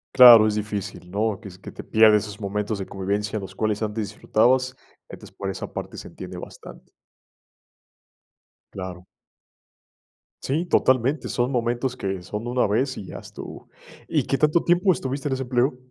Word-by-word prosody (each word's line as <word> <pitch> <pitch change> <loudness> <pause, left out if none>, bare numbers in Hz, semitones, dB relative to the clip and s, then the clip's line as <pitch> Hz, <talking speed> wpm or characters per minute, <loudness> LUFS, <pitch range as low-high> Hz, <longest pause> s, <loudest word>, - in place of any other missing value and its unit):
Claro, 120 -4 +10
es 105 - 0
difícil, 100 -3 -5
¿no?, 105 0 -1
que - - -10
es 90 0 -14
que - - -10
te - - -9
pierdes 110 -2 +5
esos 105 -1 -8
momentos 105 +1 -2
de 95 - -4
convivencia, 100 +2 -2
los 95 -1 -8
cuales 105 +1 -1
antes 105 -2 -3
disfrutabas, 125 +4 +1 0.3
entonces, - - -12
por 100 -1 -4
esa 95 - -6
parte - - -6
se - - -8
entiende - - -9
bastante. - - -11 1.8
Claro. 95 -1 -7 1.4
Sí, 155 +6 -1
totalmente, 130 -2 +2
son 125 +2 0
momentos 120 +1 -1
que 95 -4 -3
son 105 +6 -6
una 125 -2 +1
vez 130 +6 0
y 100 - -7
ya - - -8
estuvo. - - -10 0.4
¿Y - - +1
qué 135 - 0
tanto 155 +2 +3
tiempo 180 +2 +3
estuviste 135 0 -4
en 135 - 0
ese 130 0 -2
empleo? 125 +1 +1
110 Hz, 165 wpm, -24 LUFS, 100-130 Hz, 1.8 s, Claro